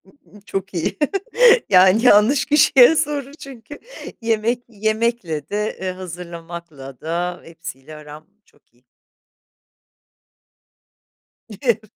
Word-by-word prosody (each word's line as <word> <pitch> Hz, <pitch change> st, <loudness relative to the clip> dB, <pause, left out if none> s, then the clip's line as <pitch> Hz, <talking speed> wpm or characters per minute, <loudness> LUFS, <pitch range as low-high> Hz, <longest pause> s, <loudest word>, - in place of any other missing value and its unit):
Iıı, 235 Hz, -8 st, -21 dB
çok 195 Hz, 0 st, -5 dB
iyi, 170 Hz, -3 st, -3 dB, 0.7 s
yani, 190 Hz, +3 st, +5 dB
yanlış 235 Hz, +4 st, +5 dB
kişiye 295 Hz, -1 st, +5 dB
soru 295 Hz, -3 st, -2 dB
çünkü 275 Hz, -2 st, -12 dB, 0.4 s
yemek 230 Hz, +2 st, -1 dB
yemekle 215 Hz, -8 st, -2 dB
de, 210 Hz, +1 st, -3 dB
eee, 190 Hz, -1 st, -2 dB
hazırlamakla 170 Hz, -6 st, -10 dB
da 175 Hz, +2 st, -3 dB
hepsiyle 160 Hz, -3 st, -11 dB
aram 150 Hz, +1 st, -12 dB, 0.2 s
çok -, -, -32 dB
iyi. 120 Hz, +1 st, -33 dB, 2.8 s
Evet. 235 Hz, -5 st, +1 dB
195 Hz, 95 wpm, -20 LUFS, 170-235 Hz, 2.8 s, yani